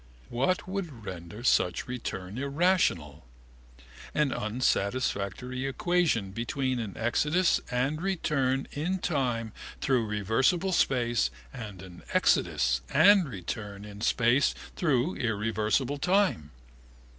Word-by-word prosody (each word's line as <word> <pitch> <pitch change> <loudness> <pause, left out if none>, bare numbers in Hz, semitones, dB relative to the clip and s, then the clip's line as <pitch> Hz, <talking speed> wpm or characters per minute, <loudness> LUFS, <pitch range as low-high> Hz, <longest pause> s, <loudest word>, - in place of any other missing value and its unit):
What 135 +12 0
would 170 - -5
render 95 +4 -8
such 90 -7 +2
return 110 -4 -5
irrational? 140 - +1 0.9
An 150 -3 +2
unsatisfactory 125 +2 -1
equation 140 - +1
between 125 +4 -2
an 105 -4 -5
exodus 150 +10 +2
and 135 +6 -1
return 140 -8 0
in 170 +6 -1
time 125 - -1 0.3
through 125 -5 +1
reversible 115 - +1
space 120 - +2 0.2
and 105 -5 -8
an 90 -2 -12
exodus 65 -7 +2
and 185 0 +5
return 100 0 -6
in 105 0 -10
space 120 +5 +3 0.2
through 150 0 +1
irreversible 115 +4 0
time. 180 - +1
125 Hz, 100 wpm, -28 LUFS, 105-150 Hz, 0.9 s, and